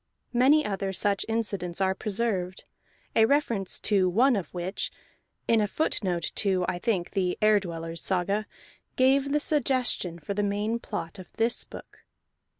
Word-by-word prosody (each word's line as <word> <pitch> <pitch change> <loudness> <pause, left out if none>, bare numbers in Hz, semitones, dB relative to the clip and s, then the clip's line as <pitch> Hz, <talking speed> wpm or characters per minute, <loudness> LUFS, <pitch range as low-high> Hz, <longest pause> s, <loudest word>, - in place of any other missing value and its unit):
Many 275 +5 +5
other 195 -1 -2
such 200 +1 0
incidents 200 -6 -1
are 190 -1 +2
preserved, 195 -3 -2 0.5
a 220 - +6
reference 230 -8 +1
to 195 -3 +3
one 245 +8 +4
of 195 -4 -4
which 180 +2 -3 0.6
(in 225 -1 +4
a 210 - +1
footnote 185 - -1
to 190 -3 +2
I 175 - -2
think 185 -5 -1
the 185 -3 0
Ere 215 -1 +5
Dwellers' 165 -3 -6
Saga) 195 +3 0 0.5
gave 270 +2 +3
the 295 - +3
suggestion 255 - +1
for 170 +5 -5
the 205 - -1
main 205 +3 -1
plot 205 -5 -6
of 185 - -11
this 230 +1 0
book. - - -13
205 Hz, 150 wpm, -27 LUFS, 185-230 Hz, 0.6 s, a